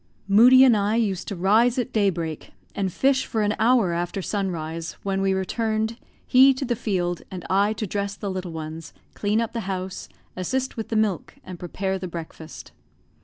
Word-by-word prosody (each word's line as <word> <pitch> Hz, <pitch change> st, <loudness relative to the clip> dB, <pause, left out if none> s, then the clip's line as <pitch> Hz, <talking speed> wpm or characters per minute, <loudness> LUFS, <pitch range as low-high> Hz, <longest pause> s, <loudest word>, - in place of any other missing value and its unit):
Moodie 245 Hz, +6 st, +7 dB
and 250 Hz, -4 st, +6 dB
I 205 Hz, +1 st, +1 dB
used 200 Hz, -5 st, -1 dB
to 200 Hz, -, -4 dB
rise 220 Hz, +7 st, +3 dB
at 250 Hz, 0 st, -2 dB
daybreak, 170 Hz, -7 st, -1 dB, 0.2 s
and 195 Hz, -3 st, -2 dB
fish 270 Hz, +7 st, +1 dB
for 220 Hz, -3 st, -1 dB
an 205 Hz, 0 st, +1 dB
hour 225 Hz, -6 st, +3 dB
after 175 Hz, +3 st, -2 dB
sunrise, 165 Hz, -5 st, -3 dB
when 195 Hz, -1 st, -1 dB
we 195 Hz, 0 st, +2 dB
returned, 220 Hz, +3 st, -1 dB, 0.3 s
he 265 Hz, +1 st, +6 dB
to 270 Hz, -, -3 dB
the 240 Hz, -1 st, 0 dB
field, 175 Hz, -5 st, -2 dB
and 180 Hz, -2 st, -7 dB
I 200 Hz, +3 st, +3 dB
to 215 Hz, -, -4 dB
dress 200 Hz, +1 st, -3 dB
the 200 Hz, -2 st, -4 dB
little 185 Hz, -2 st, -5 dB
ones, 160 Hz, 0 st, -7 dB, 0.2 s
clean 210 Hz, +1 st, 0 dB
up 230 Hz, -1 st, -2 dB
the 235 Hz, -, -2 dB
house, 185 Hz, -1 st, -5 dB, 0.3 s
assist 260 Hz, +9 st, -2 dB
with 225 Hz, -, -5 dB
the 225 Hz, -, -2 dB
milk, 215 Hz, -5 st, 0 dB
and 180 Hz, -2 st, -9 dB
prepare 190 Hz, +2 st, -3 dB
the 185 Hz, -, -5 dB
breakfast. 165 Hz, -2 st, -9 dB
200 Hz, 185 wpm, -24 LUFS, 180-225 Hz, 0.3 s, Moodie